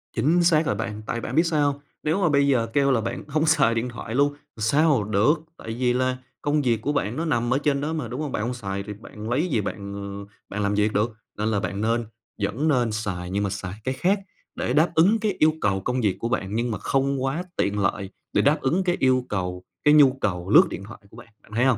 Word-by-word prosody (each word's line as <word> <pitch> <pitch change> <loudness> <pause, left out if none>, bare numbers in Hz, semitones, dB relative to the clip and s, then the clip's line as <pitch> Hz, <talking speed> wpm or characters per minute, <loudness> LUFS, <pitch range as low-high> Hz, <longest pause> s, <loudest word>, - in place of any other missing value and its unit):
Chính 170 +5 +3
xác 165 -2 +4
à - - +1
bạn! 105 0 -4
Tại 115 - -3
bạn - - -5
biết 165 - +5
sao 150 -4 +2
hông? 140 0 -10 0.2
Nếu 160 +6 +1
mà 175 - +3
bây 140 -1 +3
giờ 120 -5 +2
kêu 140 -1 +3
là 120 -4 +2
bạn 115 - -4
hông 155 +2 +1
xài 155 -7 +4
điện 115 +2 -1
thoại 115 -1 -6
luôn, 140 +2 +4
làm 145 - -19 0.2
sao 140 +3 +3
được? 105 +7 +3 0.2
Tại 110 - -6
vì 125 -1 +2
là 130 0 0 0.2
công 145 0 +1
việc 115 -4 +1
của 145 - -1
bạn 120 -6 -1
nó 160 +4 -2
nằm 120 -6 +1
ở - - +3
trên 140 -1 0
đó 155 +2 -2
mà, 150 -7 -3
đúng 125 +5 -5
hông? 150 -4 -3
Bạn 105 - -2
hông 125 - -2
xài 100 -5 -4
thì 105 +1 -6
bạn 105 +1 -9
lấy 140 +9 +1
gì 115 -11 0
bạn, 100 0 -5
ờ, 100 0 -7 0.2
bạn 105 +1 -3
làm 100 0 +1
việc 105 +1 +1
được? 105 +3 +1 0.3
Nên 105 - -1
là 105 - +1
bạn 100 +1 -3
nên 115 +1 +1 0.4
vẫn 110 +10 0
nên 125 -6 +2
xài 95 -5 -3
nhưng 100 +2 -1
mà 100 - 0
xài 95 -2 -5
cái 130 - -1
khác 190 +9 +1 0.4
để 125 - -1
đáp 155 +3 +3
ứng 195 +8 +5
cái 215 -1 0
yêu 155 0 +5
cầu 95 -2 +1
công 125 +1 0
việc 100 -5 +1
của 115 - -2
bạn 100 -4 -2
nhưng 120 +1 0
mà 105 - -2
không 135 -1 0
quá 140 +7 -1
tiện 105 +1 0
lợi 100 -1 -1 0.2
để - - +4
đáp 150 +1 +3
ứng 170 +8 +1
cái 175 -1 +1
yêu 130 -1 +3
cầu 90 -2 -3 0.2
cái 150 - +6
nhu 145 -3 +7
cầu 90 -2 -2
lướt - - +8
điện 100 - -6
thoại 110 +4 -11
của 110 - -16
bạn, 120 - -12 0.2
bạn - - -21
thấy 125 - +3
hông? 130 -4 +3
120 Hz, 265 wpm, -24 LUFS, 105-145 Hz, 0.4 s, lướt